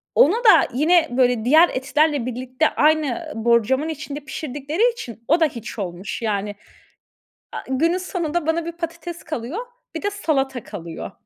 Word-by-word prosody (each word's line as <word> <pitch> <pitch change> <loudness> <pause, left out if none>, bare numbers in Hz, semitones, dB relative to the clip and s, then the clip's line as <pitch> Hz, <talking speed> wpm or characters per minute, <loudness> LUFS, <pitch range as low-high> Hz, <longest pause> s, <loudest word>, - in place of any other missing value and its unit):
Ona 350 +10 +6
da 460 -3 +6
yine 325 +5 +4
böyle 245 -3 +2
diğer 315 +6 +6
etlerle 285 0 +1
birlikte, 255 +4 -1
aynı 310 +1 +1
borcamın 235 +6 +2
içinde 295 -2 -5
pişirdikleri 295 - -1
için, 235 - -9
o 330 +4 +4
da 325 - +5
hiç 235 -5 -6
olmuş. 190 +5 -5
Yani, 205 -2 -2 1.0
a - - -3
günün 325 +7 +2
sonunda 345 -3 -2
bana 320 +1 0
bir 340 - -3
patates 335 0 -6
kalıyor, 310 - -5 0.3
bir - - -3
de 410 - -1
salata 270 - -1
kalıyor. 170 -5 -7
295 Hz, 150 wpm, -22 LUFS, 245-335 Hz, 1.0 s, Ona